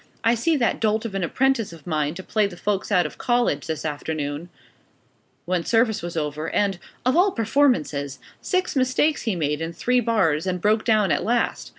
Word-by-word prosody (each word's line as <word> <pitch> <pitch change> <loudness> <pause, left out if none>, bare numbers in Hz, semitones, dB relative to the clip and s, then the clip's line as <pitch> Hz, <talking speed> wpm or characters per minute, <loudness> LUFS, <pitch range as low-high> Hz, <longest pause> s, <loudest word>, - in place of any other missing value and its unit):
"I 230 0 +4
set 295 +7 +1
that 240 -4 +1
dolt 220 0 +1
of 220 - -4
an 195 -1 -2
apprentice 255 +3 +1
of 165 -4 -13
mine 155 -2 -1
to 190 - -7
play 215 +1 +1
the 175 -3 -10
folks 205 +1 -2
out 180 -4 +4
of 150 - -7
college, 240 - +1
this 160 -1 -4
afternoon, 150 +1 -4 1.0
when 180 -1 0
service 225 0 +2
was 170 0 -5
over, 150 +1 -2
and 195 -3 0 0.3
of 255 - +3
all 365 +4 +5
performances! 210 - +1 0.2
Six 370 -4 -1
mistakes 265 +3 +2
he 220 -5 -1
made 150 -2 -1
in 165 +1 -3
three 250 +7 +1
bars, 190 -9 +1
and 180 -1 -1
broke 215 +4 +2
down 215 -5 +3
at 145 - +1
last. 235 +2 0
195 Hz, 195 wpm, -23 LUFS, 160-235 Hz, 1.0 s, all